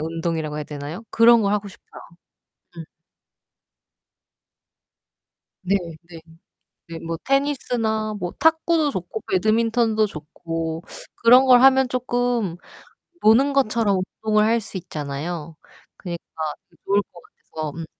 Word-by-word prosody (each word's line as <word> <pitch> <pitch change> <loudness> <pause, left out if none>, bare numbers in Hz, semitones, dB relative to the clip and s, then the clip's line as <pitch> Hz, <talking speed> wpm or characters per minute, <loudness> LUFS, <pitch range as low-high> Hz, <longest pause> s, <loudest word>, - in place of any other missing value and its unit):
운동이라고 160 -1 -3
해야 150 - -4
되나요? 150 +7 -7
그런 230 0 +6
걸 200 0 +1
하고 205 -1 -1
싶어요. 190 - -14 0.8
음. 165 - -6 2.8
네네. 170 -3 -4 0.7
네, 165 -1 -7
뭐 165 0 -4
테니스나 245 -6 0
뭐 175 -3 -4
탁구도 320 -1 +2
좋고 185 -1 -5
배드민턴도 220 +2 +2
좋고 165 -1 -5 0.3
그런 250 +3 +6
걸 250 -2 +6
하면 265 -1 +5
쪼끔 245 -6 -1 0.7
노는 255 +6 +4
것처럼 225 -6 +2 0.3
운동을 215 -1 +3
할 230 +2 +2
수 200 - -6
있잖아요. 155 0 -6 0.4
그러니까 175 -2 -6 0.5
더 - - -27
좋을 200 +1 +2
것 170 - -14 0.3
같아서. 155 -1 -4
음. 165 - -5
205 Hz, 245 characters per minute, -22 LUFS, 165-235 Hz, 2.8 s, 그런